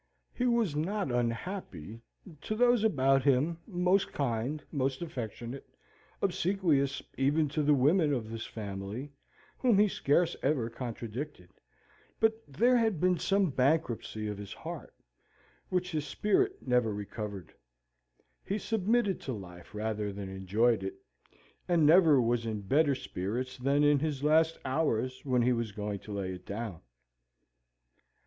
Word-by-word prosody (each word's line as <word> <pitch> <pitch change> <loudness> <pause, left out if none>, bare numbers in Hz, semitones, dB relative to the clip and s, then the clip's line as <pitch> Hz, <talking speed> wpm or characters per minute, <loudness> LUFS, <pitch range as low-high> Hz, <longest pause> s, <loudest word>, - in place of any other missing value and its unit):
He 250 - 0
was 230 -10 +2
not 185 +1 -1
unhappy 115 - -3 0.4
to 215 - -3
those 240 -1 +4
about 135 -9 +3
him 145 +5 +2
most 185 0 +1
kind 140 +3 -2
most 135 +1 -1
affectionate, 120 -3 -6 0.5
obsequious 175 -7 +1 0.2
even 145 +3 +3
to 155 +2 -1
the 150 0 +4
women 150 +4 +3
of 125 -5 -1
his 115 +1 -6
family, 105 +5 -6 0.5
whom 245 -5 +4
be 210 +1 +6
scarce 170 -2 +1
ever 130 -5 0
contradicted; 120 -3 -6 0.7
but 225 0 +4
there 235 - +3
had 220 -7 +1
been 180 0 +2
some 195 -4 +2
bankruptcy 125 -6 0
of 105 -1 -4
his 100 -1 -7
heart, - - -8 0.7
which 180 -1 -1
his 155 -2 -2
spirit 380 - 0
never 125 -3 +3
recovered. 105 -2 -6 0.9
He 200 - -2
submitted 215 -1 +1
to 130 - -4
life, 90 -2 -10
rather 105 -1 -2
than 100 -1 -6
enjoyed 100 +5 +1
it, 370 - -4 0.7
and 170 -4 +3
never 160 -3 +7
was 115 -1 +1
in 110 -2 -3
better 140 +7 +3
spirits 125 +3 -4
than 140 +3 +2
in 145 -1 +5
his 145 -2 -2
last 160 +2 +4
hours 130 -3 0
when 125 -3 +2
he 125 +1 +3
was 115 -2 -2
going 105 0 -4
to 105 - -11
lay 95 -2 -3
it 90 0 -10
down. 100 -4 -5
135 Hz, 140 wpm, -30 LUFS, 115-170 Hz, 0.9 s, never